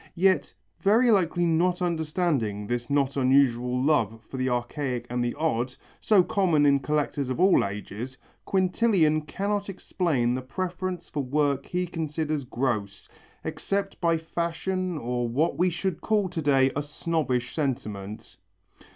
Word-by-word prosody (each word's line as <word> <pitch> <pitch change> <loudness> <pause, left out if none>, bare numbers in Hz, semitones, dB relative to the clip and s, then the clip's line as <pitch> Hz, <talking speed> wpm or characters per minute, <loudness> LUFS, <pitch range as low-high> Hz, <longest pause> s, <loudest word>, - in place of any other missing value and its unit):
Yet, 190 +1 +2 0.3
very 230 +5 +4
likely 175 -3 +2
not 175 +2 +2
understanding 160 - -1
this 120 +3 -3
not 140 -1 +1
unusual 125 -2 +3
love 115 -6 +1
for 135 - -7
the 130 0 0
archaic 125 0 -2
and 125 0 0
the 120 - -2
odd, 125 -5 -1 0.2
so 205 -4 +4
common 175 -5 +2
in 140 -1 +5
collectors 145 -2 -1
of 130 - -2
all 190 +1 +5
ages, 105 +6 -6 0.3
Quintilian 185 -4 +2
cannot 200 +2 -2
explain 155 -10 0
the 130 - -2
preference 180 +5 -4
for 145 - -3
work 140 +1 0
he 180 0 -1
considers 155 -4 -3
gross, 110 -6 -2 0.4
except 200 0 -3
by 165 -1 +3
fashion 170 +2 -2
or 120 -2 -2
what 150 +8 +1
we 180 +1 +4
should 175 -1 -3
call 210 -3 +1
to 175 -2 -3
day 135 -2 +3
a 145 - 0
snobbish 145 -4 -2
sentiment. 105 -8 -4
150 Hz, 140 wpm, -26 LUFS, 125-180 Hz, 0.4 s, in